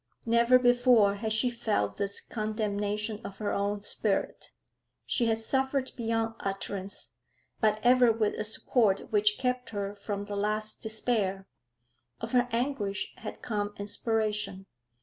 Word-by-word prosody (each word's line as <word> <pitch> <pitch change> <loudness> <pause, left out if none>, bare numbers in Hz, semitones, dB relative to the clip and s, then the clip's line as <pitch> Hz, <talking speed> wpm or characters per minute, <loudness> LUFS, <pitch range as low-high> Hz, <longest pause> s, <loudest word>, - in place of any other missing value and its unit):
Never 235 +2 +5
before 245 -4 +5
had 220 +2 -3
she 245 +3 +2
felt 215 - -1
this 200 0 0
condemnation 215 -1 -2
of 195 - -8
her 210 -1 -2
own 200 +1 -1
spirit. 205 0 -2 0.5
She 235 - +1
had 225 -1 +2
suffered 265 +3 0
beyond 225 -1 -1
utterance, 195 - -4 0.5
but 215 -1 +2
ever 245 -1 +6
with 220 -2 0
a - - -3
support 215 0 +2
which 210 0 +3
kept 250 -1 -1
her 200 -2 -3
from 205 0 -5
the 205 0 -5
last 215 +1 -1
despair; 215 -3 -1 0.7
of - - -5
her 245 -1 +3
anguish 230 -5 -1
had - - -8
come 205 -2 -2
inspiration. 210 -2 -1
215 Hz, 135 wpm, -29 LUFS, 205-235 Hz, 0.7 s, ever